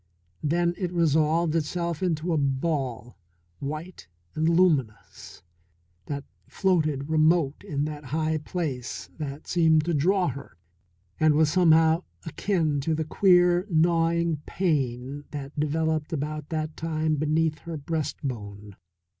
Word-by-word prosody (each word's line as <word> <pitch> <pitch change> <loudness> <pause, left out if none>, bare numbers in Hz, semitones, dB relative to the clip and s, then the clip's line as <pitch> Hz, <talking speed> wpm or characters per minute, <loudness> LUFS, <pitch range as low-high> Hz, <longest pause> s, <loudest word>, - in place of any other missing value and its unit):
Then 170 +3 +1
it 180 -3 -2
resolved 160 -1 +2
itself 170 +1 -2
into 170 -1 0
a - - +2
ball, 135 -5 -2 0.4
white 155 - -6 0.3
and 160 +1 +1
luminous, 155 - 0 0.6
that 140 -1 -4 0.2
floated 155 -7 0
remote 155 -2 +2
in 145 -1 -2
that 150 -1 -6
high 155 +3 -1
place 145 -6 -4
and 145 -1 -5
seemed 160 -3 +3
to 170 - 0
draw 180 +4 +2
her, 140 -9 -9 0.6
and 155 -1 +4
was 155 0 +3
somehow 165 -1 +4 0.2
akin 160 -3 0
to 160 +3 0
the 160 0 -2
queer, 180 +1 +4
gnawing 165 0 +2
pain 140 -5 -1
that 145 0 -7
developed 155 +1 0
about 155 -1 -4
that 155 -1 -3
time 160 -1 -1
beneath 155 +1 +1
her 165 +2 -6
breastbone. 125 -10 -5
155 Hz, 120 wpm, -26 LUFS, 145-170 Hz, 0.6 s, and